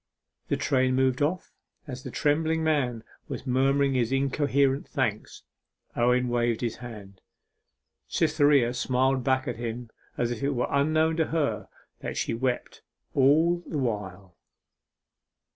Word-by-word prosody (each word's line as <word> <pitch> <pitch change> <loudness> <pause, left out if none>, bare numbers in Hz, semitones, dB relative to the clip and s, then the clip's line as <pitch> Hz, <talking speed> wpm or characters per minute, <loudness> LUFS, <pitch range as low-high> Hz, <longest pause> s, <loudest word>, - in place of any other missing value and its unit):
The - - 0
train 130 -1 +1
moved 130 0 +1
off 165 +5 -1 0.3
as 130 -3 -7
the - - -7
trembling 160 +2 +1
man 130 -8 0 0.2
was - - -6
murmuring 135 +2 +2
his 125 -2 0
incoherent 140 0 +1
thanks. 120 -7 -3 0.5
Owen 125 +1 +2
waved 120 -1 0
his 120 -2 -2
hand; 105 -6 -10 0.9
Cytherea 145 -6 +3
smiled 130 +1 +1
back 130 0 +1
to 120 - -2
him 120 0 -6 0.3
as 120 0 0
if 120 - -4
it 140 0 0
were 125 - +1
unknown 155 +3 +2
to 160 - +2
her 155 -3 -1 0.3
that - - -5
she - - -1
wept 125 +1 -2 0.3
all 160 +6 +4
the 155 - -3
while. 100 -7 -4
130 Hz, 135 wpm, -27 LUFS, 120-145 Hz, 0.9 s, all